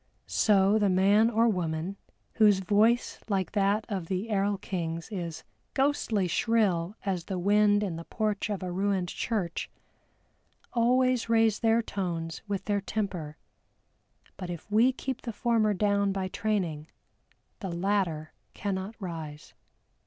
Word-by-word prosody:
So 205 0 +3
the 205 -2 +3
man 200 +4 +4
or 230 0 +3
woman, 175 -2 -1 0.4
whose 210 -3 +6
voice 215 +5 +2
like 190 -4 0
that 205 +1 +1
of 190 -7 -4
the 195 +5 -3
erl 200 0 +1
king's 170 -1 -4
is 170 -5 -5 0.3
"ghostly 265 -8 +1
shrill 195 -3 +1
as 185 -4 -1
the 190 - -3
wind 205 +2 +3
in 180 -5 -3
the 165 - -6
porch 215 -1 -2
of 200 -2 -3
a 180 - -3
ruined 190 -1 0
church," 190 -7 -2 1.0
always 250 0 +2
raise 225 -2 +3
their 230 0 +3
tones 170 -6 -4
with 200 -2 -3
their 205 -1 0
temper, 185 -8 -4 1.0
but 180 -2 -6
if 175 +4 -7
we 230 +5 +5
keep 260 0 -5
the 235 - -4
former 220 -1 +1
down 200 0 +2
by 195 -1 -2
training, 180 -8 -2 0.7
the 195 -4 -4
latter 170 -3 -1 0.2
cannot 195 +1 -3
rise. 160 -5 -7
200 Hz, 140 wpm, -28 LUFS, 180-215 Hz, 1.0 s, whose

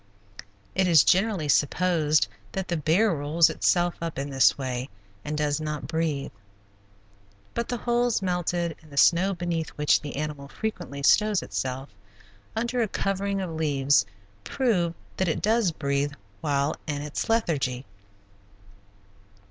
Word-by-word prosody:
It 190 -1 +2
is 165 -4 +7
generally 190 -4 +2
supposed 155 +1 +2 0.3
that 190 -1 -3
the 175 - 0
bear 170 +7 +2
rolls 155 +2 +3
itself 175 -1 +2
up 165 -1 -4
in 140 +1 -3
this 135 -1 +4
way 130 -1 -3 0.3
and 150 +1 -3
does 150 0 0
not 150 -1 -4
breathe, 160 -4 -2 1.2
but 235 0 -2
the 245 - -1
holes 240 0 +1
melted 175 -2 -1
in 155 - -18
the 140 - -12
snow 185 +6 +4
beneath 170 -2 -2
which 150 0 +3
the 145 - -6
animal 145 -1 -4
frequently 165 -4 -5
stows 210 +5 +4
itself, 130 +1 -4 0.7
under 240 +2 -1
a 225 - +1
covering 195 0 -1
of 180 -3 -4
leaves, 145 -6 +2 0.4
prove 180 - 0 0.2
that 190 - +1
it 160 - 0
does 220 -3 +2
breathe 140 -1 -1 0.3
while 145 -1 0
in 145 -1 -3
its 150 +7 -4
lethargy. 140 - 0
160 Hz, 140 wpm, -26 LUFS, 145-190 Hz, 1.2 s, is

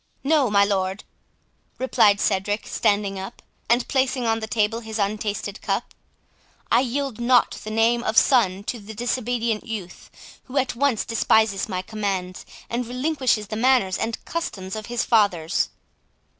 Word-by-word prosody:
"No, 285 -3 +3
my 200 -1 +4
lord," 195 0 -1 0.7
replied 210 -5 +3
Cedric, 205 +1 0
standing 200 -1 0
up, 190 - -8 0.3
and 235 +1 +3
placing 265 -2 0
on 225 0 +1
the 220 - -5
table 220 0 0
his 220 -1 -6
untasted 210 0 -2
cup, - - -2 0.8
"I - - +6
yield 265 -1 -2
not 245 0 +3
the 215 - -6
name 230 +2 +2
of 220 -1 -1
son 200 -7 +4
to 235 +3 -4
the 215 +1 -10
disobedient 235 -1 -1
youth, 200 -6 -7 0.4
who 270 +2 -6
at 260 -2 +1
once 265 -3 +1
despises 220 -2 +2
my 185 -2 -3
commands, 190 -3 -4 0.2
and 240 0 -3
relinquishes 255 -3 0
the 215 - -3
manners 240 -5 +2
and 225 0 -3
customs 195 - -4
of 215 -1 -6
his 240 -1 -1
fathers." 195 -7 +2
220 Hz, 150 wpm, -23 LUFS, 200-245 Hz, 0.8 s, I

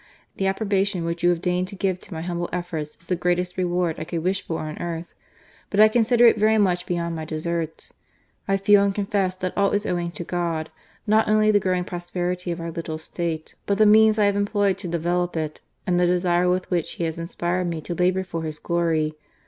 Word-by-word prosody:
The 195 - 0
approbation 195 -2 0
which 170 +1 -3
you 175 - +4
have 175 0 0
deigned 180 0 0
to 200 - -8
give 185 -1 -1
to 200 - -16
my 160 - -4
humble 175 0 -3
efforts 170 -4 -4
is - - -14
the 180 - 0
greatest 180 +1 0
reward 175 -2 0
I - - -3
could 165 0 -4
wish 190 +2 0
for 165 - -4
on 155 -1 -6
earth; 170 0 -5 0.6
but 200 - -1
I 215 0 +8
consider 240 +1 +4
it 230 -2 +6
very 220 +1 +4
much 180 -4 +1
beyond 170 -1 -2
my 160 - -4
deserts. 160 +1 -4 0.5
I 195 - +2
feel 200 +1 +5
and 200 -1 0
confess 195 -2 0
that 185 -1 -4
all 200 -1 +3
is 205 +1 0
owing 175 -3 -1
to 175 - -6
God, 170 -2 -2 0.3
not 215 +1 +3
only 215 0 +4
the 205 - +4
growing 185 -2 0
prosperity 175 0 -3
of 170 0 -3
our 165 0 -4
little 160 -1 -4
State, 160 0 -4
but 200 - +1
the 215 - +5
means 215 +1 +6
I 210 - +4
have 200 0 +2
employed 205 -1 +1
to 190 - -5
develope 175 +1 -1
it, 155 -1 -4 0.2
and 175 -1 +2
the 180 - +3
desire 175 0 +2
with 185 +1 -1
which 175 -3 0
He - - -4
has 165 0 -2
inspired 175 +1 -2
me 165 -2 -3
to 175 - -5
labour 180 +2 +1
for 165 -3 -5
His 155 -1 -4
glory. 165 -2 0
180 Hz, 225 wpm, -24 LUFS, 170-195 Hz, 0.6 s, I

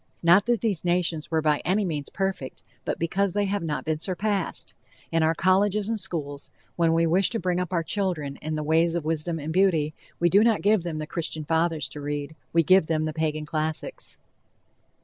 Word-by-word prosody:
Not 175 +6 +5
that 240 -2 +2
these 205 -8 +1
nations 175 -3 0
were 160 -1 0
by 150 -1 +2
any 200 +3 +1
means 150 -5 -3
perfect, 190 -9 -3 0.2
but - - -2
because 185 +3 0
they 205 0 +1
have 200 +1 -1
not 155 -3 -3
been 155 -1 -1
surpassed. 195 +1 -2 0.4
In 165 0 +2
our 160 +1 +2
colleges 195 +3 +2
and 225 -1 -1
schools, 150 -7 -5 0.3
when 165 -1 +2
we 165 0 +3
wish 180 +4 +3
to 230 - -2
bring 180 0 0
up 180 -1 -3
our 170 -2 0
children 160 -7 -2
in 155 0 -3
the 155 - -2
ways 165 +2 +2
of 170 -3 -2
wisdom 165 +1 -1
and 155 +1 -4
beauty, 165 -5 +2 0.3
we 175 - +4
do 200 +5 +5
not 225 -2 +2
give 210 -1 +4
them 165 -2 -4
the 155 - -3
Christian 155 -1 -4
fathers 160 -3 0
to 145 - -8
read, 145 +1 -4 0.2
we 165 0 +4
give 185 +1 +5
them 155 -1 0
the 155 - -3
Pagan 155 -1 -2
classics. 155 0 -4
165 Hz, 205 wpm, -25 LUFS, 155-190 Hz, 0.4 s, Not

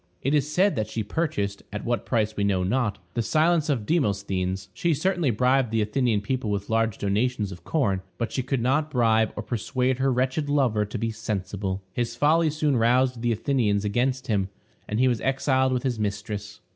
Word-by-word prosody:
It 135 - +1
is 150 0 +1
said 190 +5 +3
that 110 -1 0
she 110 0 -2
purchased, 105 -6 -2
at 105 0 -5
what 120 0 -1
price 110 -3 0
we 100 - -1
know 95 -2 +1
not, 105 +1 0 0.2
the 115 - 0
silence 155 +5 +2
of 120 -8 0
Demosthenes; 100 - -1
she 170 -2 +1
certainly 175 -1 +1
bribed 125 +2 +2
the 110 -1 +1
Athenian 110 -1 +1
people 125 +1 -2
with 100 +1 -2
large 115 -2 +1
donations 105 +1 0
of 90 -2 -10
corn. 100 - 0 0.2
But 115 - -2
she 130 - -1
could 130 0 -1
not 145 +5 +1
bribe 110 -4 +2
or 105 - -4
persuade 125 +3 -1
her 135 0 +2
wretched 130 +4 0
lover 125 -7 +2
to 105 - -5
be 115 0 -1
sensible; 100 -2 -3
his 120 -1 -2
folly 155 +5 +3
soon 150 -3 +1
roused 125 +1 +2
the 120 0 +1
Athenians 110 -4 +1
against 125 +5 0
him, 100 -5 0 0.4
and 105 - -1
he 130 - +4
was 120 -3 +1
exiled 130 0 +1
with 125 -1 -1
his 125 -4 -1
mistress. 105 0 -4
120 Hz, 195 wpm, -25 LUFS, 105-135 Hz, 0.4 s, he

